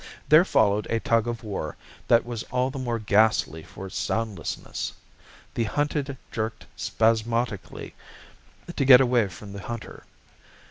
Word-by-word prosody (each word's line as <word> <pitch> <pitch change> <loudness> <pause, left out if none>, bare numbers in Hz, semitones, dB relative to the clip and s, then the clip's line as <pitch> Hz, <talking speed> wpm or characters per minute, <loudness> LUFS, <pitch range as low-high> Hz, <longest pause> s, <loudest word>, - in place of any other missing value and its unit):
There 155 +3 +8
followed 105 - +2
a 115 - +1
tug 115 0 +1
of 120 0 -4
war 100 -8 -4 0.3
that 115 0 +4
was 120 -2 -4
all 125 +1 0
the 135 - -6
more 120 -2 -1
ghastly 105 -6 +2
for 95 - -10
its 95 - -5
soundlessness. 110 -8 -3 0.6
The 115 - 0
hunted 145 +3 -1
jerked 110 0 -4
spasmodically 115 -1 -1 0.8
to 140 - +1
get 130 -2 +9
away 120 -4 +3
from 100 +2 -10
the 100 - -7
hunter. 115 +2 -7
115 Hz, 140 wpm, -25 LUFS, 105-125 Hz, 0.8 s, get